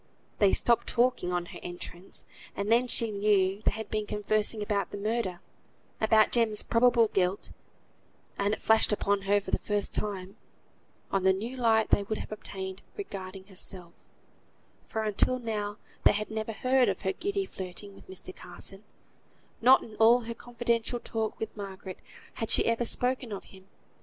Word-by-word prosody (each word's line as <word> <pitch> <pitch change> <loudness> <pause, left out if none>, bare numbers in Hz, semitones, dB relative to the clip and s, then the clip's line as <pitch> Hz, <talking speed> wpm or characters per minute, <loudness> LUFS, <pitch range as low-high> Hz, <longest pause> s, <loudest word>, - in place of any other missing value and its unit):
They 200 -2 +5
stopped 235 -1 +3
talking 240 -7 +1
on 175 -1 -1
her - - -8
entrance, 175 +1 -5 0.3
and 200 +2 -2
then 240 +2 +4
she 230 -2 +4
knew 200 -1 +2
they - - +4
had 220 0 -6
been 215 -1 -1
conversing 210 +1 0
about 205 -1 -1
the - - -6
murder; 200 -4 -2 0.6
about 220 0 +5
Jem's 225 -3 +2
probable 230 -1 +4
guilt; 185 0 0 0.8
and 200 +1 0
(it - - -20
flashed 220 0 +4
upon 200 -1 +1
her 205 0 +5
for 200 - -8
the - - +2
first 205 -1 -1
time) 195 -1 -3 0.7
on 195 - +1
the 190 0 +5
new 225 +7 -5
light 225 -3 +2
they - - +5
would 215 +2 -3
have - - -7
obtained 190 -2 -6 0.2
regarding 195 - -7
herself: 185 -3 -3 0.9
for 220 - -2
until 215 +4 +2
now 210 -3 -3 0.3
they - - +6
had 215 +1 -3
never 220 0 -3
heard 255 +3 +3
of - - -3
her 190 -1 -1
giddy 395 - -2
flirting 190 - -8
with - - -17
Mr. 185 0 -8
Carson; 195 +3 -6 0.8
not 255 +3 +7
in 220 - -11
all 235 +2 +6
her 230 0 -5
confidential 235 0 -1
talk 220 -2 -3
with 220 - -5
Margaret 195 -2 -7 0.3
had 225 - -4
she - - +4
ever 230 +1 +1
spoken 250 0 +2
of 200 - -5
him. 190 0 -17
210 Hz, 170 wpm, -29 LUFS, 195-230 Hz, 0.9 s, not